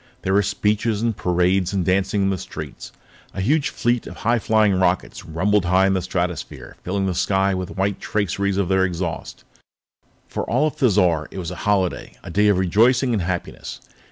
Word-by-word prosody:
There 95 - 0
were 100 - +5
speeches 105 +2 0
and 115 -2 0
parades 90 +1 +1
and 95 -3 0
dancing 95 +2 +1
in 95 - +2
the 95 - -1
streets. - - -8 0.4
A - - -4
huge 145 +7 +2
fleet 120 0 -1
of - - -8
high 115 +1 +1
flying 110 -3 +2
rockets 90 0 0
rumbled 95 +5 +1
high 95 +2 +4
in 95 - +2
the 95 - 0
stratosphere, 90 -1 -4
filling 95 +1 -2
the 95 - 0
sky 95 +2 +1
with 95 -1 -3
the - - -11
white 100 +1 -1
traceries 100 -1 -1
of 100 -3 +1
their 95 0 +2
exhausts. 85 -2 -4 0.8
For - - -4
all 130 +6 +2
of 155 - -1
Thizar, 90 - +2
it - - -10
was 90 -2 -4
a - - -6
holiday, 95 -3 0
a - - -8
day 105 +4 +3
of 100 -3 +4
rejoicing 120 +7 +3
and 105 - 0
happiness. 90 0 -4
95 Hz, 195 wpm, -22 LUFS, 90-105 Hz, 0.8 s, were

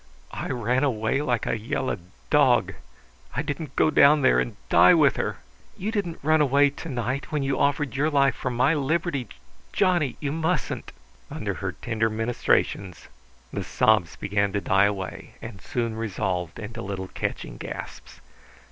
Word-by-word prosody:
"I - - -4
ran 125 +2 0
away 120 0 0
like 125 -6 0
a 115 - -1
yellow 125 +1 -2 0.3
dog! - - +4 0.6
I - - 0
didn't 145 -1 -5
go 155 - +3
down 145 0 +6
there 60 - +5
and - - -2
die - - +7
with - - +4
her!" - - -2 0.4
"You 205 +4 -3
didn't 200 -7 -2
run 155 +1 +4
away 140 0 +4
to 155 +3 -8
night 130 +3 -3
when 150 -2 0
you 135 0 -1
offered 140 -2 +1
your 145 +3 +2
life 140 -3 +3
for 130 - -4
my 125 +5 +2
liberty. 150 -3 -1 0.4
Johnny, 175 - +1
you 145 -2 -2
mustn't!" 160 +1 -2 0.4
Under - - -3
her - - -4
tender 115 -1 -1
ministrations 110 -4 -1 0.4
the - - -2
sobs 105 -7 +2
began 100 0 0
to 100 - +1
die 95 +1 +3
away 95 -1 -4
and 110 -5 -9
soon 115 -2 -2
resolved 90 -6 -3
into 115 +2 -7
little 95 -2 -5
catching - - -4
gasps. - - -8
125 Hz, 160 wpm, -25 LUFS, 105-145 Hz, 0.6 s, die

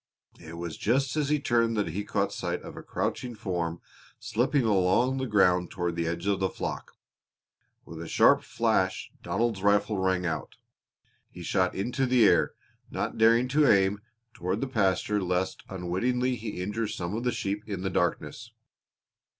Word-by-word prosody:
It 80 -1 -10
was 85 -1 -6
just 130 +4 +1
as 150 -2 0
he 150 0 +2
turned 115 -4 +1
that 105 -5 0
he 100 +6 -3
caught - - -1
sight - - -3
of - - -9
a - - -8
crouching 120 -2 -3
form 85 -6 -3 0.4
slipping 120 +4 0
along 105 +6 +2
the 130 - -2
ground 90 -4 +3
toward 85 -3 -2
the 85 -1 -1
edge 85 +2 -3
of 100 -1 +1
the 95 -1 +1
flock. - - -5 0.9
With 80 0 -9
a 85 - -6
sharp - - +5
flash 100 -5 0
Donald's 100 +3 -1
rifle 100 0 +2
rang 95 -1 +1
out. 80 -3 -3 0.7
He 90 - -10
shot 95 +1 +1
into 125 +7 -1
the 125 -3 +5
air, - - +3 0.4
not - - -3
daring 115 +3 +5
to 145 +2 +4
aim 100 +1 +3 0.3
toward 90 +4 -2
the 135 - -1
pasture 105 -3 +1
lest 90 0 -1
unwittingly 120 +8 -1
he 110 -5 -6
injure 105 +3 -2
some 90 -2 -4
of 115 - -3
the 125 - +1
sheep 100 -1 -3
in 100 -3 -4
the 95 - -1
darkness. 90 +5 -2
100 Hz, 170 wpm, -28 LUFS, 90-115 Hz, 0.9 s, sharp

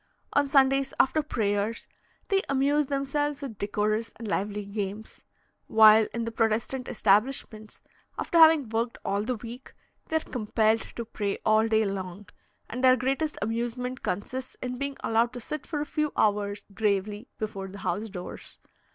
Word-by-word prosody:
On 285 0 +3
Sundays, 270 -1 +3
after 310 +4 +4
prayers, 215 -5 -1 0.4
they 390 -1 +3
amuse 280 +2 +2
themselves 280 +1 -1
with 245 -7 -7
decorous 210 +2 -1
and 230 - -7
lively 205 0 -2
games; 205 +1 -5 0.4
while 220 0 +7
in 235 -1 -3
the 230 - -3
Protestant 230 +4 0
establishments, 215 0 0 0.3
after 335 - +1
having 320 -5 +7
worked 230 +1 -1
all 200 +1 0
the 250 +4 -1
week, 235 +3 -10 0.3
they 320 - -3
are - - +1
compelled 220 -3 +1
to 235 - -4
pray 205 -2 -3
all 215 +1 +4
day 220 -1 +3
long, 195 0 -5 0.4
and 250 +2 -5
their 255 0 +7
greatest 270 +5 -1
amusement 240 +3 -3
consists 250 +7 -3
in 250 0 -4
being 280 0 -3
allowed 230 +2 +2
to 245 - -6
sit 295 +5 -6
for 295 -3 -2
a - - -2
few 300 0 -1
hours 205 -1 +1
gravely 205 +1 -1
before 200 -3 -4
the 195 +1 -10
house 210 +2 -2
doors. 180 -3 -8
225 Hz, 160 wpm, -27 LUFS, 210-265 Hz, 0.4 s, while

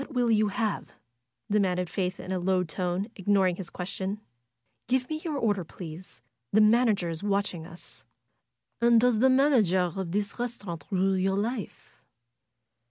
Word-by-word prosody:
"What 280 - -9
will 245 -2 +2
you 215 -1 +3
have?" 210 +1 -2 0.6
demanded 185 -3 +1
Faith 185 +1 -2
in 185 - -6
a 185 - 0
low 185 0 +1
tone, 180 +5 -2
ignoring 190 -2 +2
his 190 - -7
question. 190 +2 -4 0.7
"Give 255 0 +1
me 310 - -2
your 315 -4 -2
order, 205 -7 +1
please. 165 -4 -10 0.3
The 215 - +4
manager 215 -3 +4
is 160 - -5
watching 200 -5 -1
us." 170 0 -11 0.8
"And 235 -1 +6
does 240 -2 +3
the 260 +3 +5
manager 215 - +3
of 190 -3 -4
this 205 +4 -2
restaurant 205 -10 -5
rule 190 0 +2
your 190 +1 +1
life?" 220 -2 -5
200 Hz, 155 wpm, -28 LUFS, 180-230 Hz, 0.8 s, And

